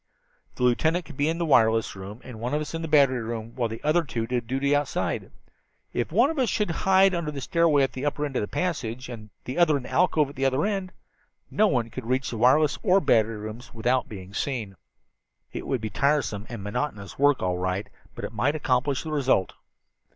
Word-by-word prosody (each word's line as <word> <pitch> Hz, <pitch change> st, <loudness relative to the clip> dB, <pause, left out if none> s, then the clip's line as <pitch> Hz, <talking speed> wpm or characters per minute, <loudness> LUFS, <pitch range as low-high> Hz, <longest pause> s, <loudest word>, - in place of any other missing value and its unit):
"The -, -, -3 dB
lieutenant 160 Hz, +8 st, +2 dB
could 155 Hz, -, -11 dB
be 145 Hz, +3 st, +1 dB
in 165 Hz, -, -1 dB
the 170 Hz, -, -1 dB
wireless 115 Hz, -7 st, +3 dB
room, 100 Hz, +5 st, -9 dB
and 125 Hz, -4 st, -9 dB
one 125 Hz, +5 st, -2 dB
of 150 Hz, -, 0 dB
us 150 Hz, -, -6 dB
in 165 Hz, -, -3 dB
the 165 Hz, -, -3 dB
battery 140 Hz, -5 st, +4 dB
room, 115 Hz, 0 st, -5 dB
while 120 Hz, -3 st, -1 dB
the 115 Hz, +1 st, -7 dB
other 155 Hz, +3 st, +3 dB
two 115 Hz, -6 st, -3 dB
did 120 Hz, -1 st, -2 dB
duty 135 Hz, +3 st, +1 dB
outside. 145 Hz, -1 st, -1 dB, 0.6 s
If 120 Hz, -, -2 dB
one 235 Hz, -, +4 dB
of 320 Hz, -, -4 dB
us 255 Hz, -, +2 dB
should 210 Hz, -5 st, 0 dB
hide 190 Hz, +2 st, +4 dB
under 170 Hz, -3 st, -2 dB
that 145 Hz, -2 st, -5 dB
stairway 160 Hz, -1 st, +3 dB
at 135 Hz, -, -1 dB
the 130 Hz, -, -5 dB
upper 145 Hz, 0 st, -1 dB
end 140 Hz, -3 st, -6 dB
of -, -, +1 dB
the 105 Hz, -, -2 dB
passage, 125 Hz, -, -3 dB
and 110 Hz, -3 st, -8 dB, 0.2 s
the 130 Hz, +6 st, -3 dB
other 155 Hz, -4 st, +5 dB
in 135 Hz, -, -6 dB
that -, -, -9 dB
alcove 160 Hz, -5 st, +3 dB
at -, -, -17 dB
the 135 Hz, 0 st, -1 dB
other 135 Hz, +6 st, +2 dB
end, 195 Hz, -3 st, -2 dB, 0.6 s
no 215 Hz, -, +4 dB
one 120 Hz, -, 0 dB
could 130 Hz, -3 st, -7 dB
reach 130 Hz, +1 st, 0 dB
the 115 Hz, -, -4 dB
wireless 145 Hz, +4 st, +4 dB
or 195 Hz, -1 st, +4 dB
battery 115 Hz, -, +2 dB
rooms 110 Hz, +4 st, -8 dB
without 125 Hz, +2 st, 0 dB
our 95 Hz, -1 st, -9 dB
seeing. 115 Hz, -4 st, -3 dB, 0.8 s
"It -, -, -5 dB
would 130 Hz, -4 st, -1 dB
be 110 Hz, -1 st, -4 dB
tiresome 140 Hz, -4 st, 0 dB
and 115 Hz, -5 st, -6 dB
monotonous 105 Hz, -1 st, -4 dB
work, 145 Hz, -4 st, +3 dB
all 90 Hz, -1 st, 0 dB
right, 95 Hz, +2 st, -2 dB, 0.3 s
but -, -, -5 dB
it -, -, -7 dB
might 130 Hz, +8 st, +1 dB
accomplish 135 Hz, -1 st, 0 dB
the 160 Hz, -, -5 dB
result." 135 Hz, -10 st, +1 dB
130 Hz, 225 wpm, -26 LUFS, 115-155 Hz, 0.8 s, other